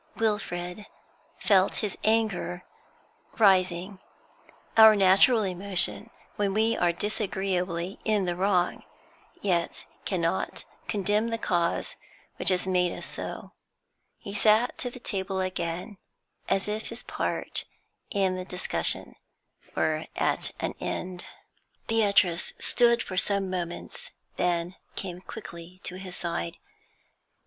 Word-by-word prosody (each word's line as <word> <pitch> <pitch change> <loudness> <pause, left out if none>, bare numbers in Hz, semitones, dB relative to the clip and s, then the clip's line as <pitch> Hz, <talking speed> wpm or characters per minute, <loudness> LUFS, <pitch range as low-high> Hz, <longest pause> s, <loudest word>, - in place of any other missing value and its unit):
Wilfrid 205 -3 -2 0.5
felt 195 -2 +3
his 200 - -2
anger 215 -5 +1 0.7
rising 185 -2 +3 0.8
our 220 -1 +9
natural 200 +4 +6
emotion 180 - 0 0.3
when 200 -1 0
we 220 +1 +3
are 175 -1 +3
disagreeably 190 -2 -2
in 210 -3 +2
the 175 -1 -1
wrong, 185 -1 +1 0.6
yet 175 -4 0 0.2
cannot 175 -1 -1 0.2
condemn 210 +2 +1
the 230 0 -1
cause 175 -5 0 0.4
which - - +2
has 185 -1 +2
made 180 -2 +2
us - - -5
so. - - -6 0.7
He 200 - -8
sat 215 +4 +4
to 245 - -2
the 250 - -10
table 190 -4 -2
again, 185 +1 -3 0.5
as 195 +1 +1
if 215 +1 -2
his - - -8
part - - -2 0.4
in 190 -2 +1
the 185 - -3
discussion 180 0 -1 0.6
were - - 0
at - - 0
an - - -2
end. 180 -1 -4 0.6
Beatrice 200 -6 +3
stood 235 -1 +3
for 185 - -6
some 195 -1 +1
moments, 175 -2 -5 0.3
then 175 +1 0 0.2
came 180 -2 -5
quickly 170 0 -9
to 180 - -5
his 185 -2 -6
side. 125 - -3
190 Hz, 115 wpm, -28 LUFS, 180-210 Hz, 0.8 s, our